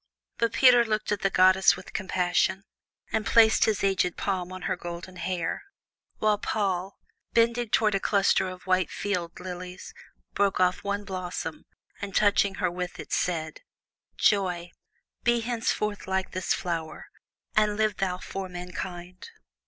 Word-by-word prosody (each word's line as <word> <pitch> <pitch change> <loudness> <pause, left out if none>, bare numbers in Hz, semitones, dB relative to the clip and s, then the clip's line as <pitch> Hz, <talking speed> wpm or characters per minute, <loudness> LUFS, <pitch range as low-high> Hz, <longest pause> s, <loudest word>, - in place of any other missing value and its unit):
But 230 -1 +1
Peter 245 -1 +7
looked 215 -2 -2
at 205 - 0
the 195 - +2
goddess 185 0 +5
with 185 - -12
compassion, 185 0 0 0.5
and 220 - +1
placed 220 +1 +5
his 215 -3 0
aged 190 -2 +1
palm 185 -2 -2
on 185 0 -8
her 185 - 0
golden 175 +1 -8
hair, 175 -2 -2 0.6
while 215 -1 +2
Paul, 195 -3 -1 0.4
bending 235 0 +2
toward 215 -1 +3
a 195 - +2
cluster 195 -2 +2
of 185 0 -10
white 185 -2 +2
field 180 -5 -3
lilies, 180 - -7 0.4
broke 200 -1 +1
off 180 0 +2
one 200 0 -2
blossom, 180 -4 -5 0.3
and 200 -1 -5
touching 200 -1 +3
her 180 -3 0
with 180 0 -5
it, - - -7
said: 160 -3 -1 0.6
"Joy, 180 -4 +1 0.5
be 240 0 +3
henceforth 225 -3 -2
like 190 0 -1
this 185 0 -3
flower, 165 -3 -2 0.5
and 210 -1 +3
live 215 -1 +1
thou 185 -2 -1
for 190 +1 -6
mankind." 180 0 -7
190 Hz, 145 wpm, -27 LUFS, 180-205 Hz, 0.6 s, Peter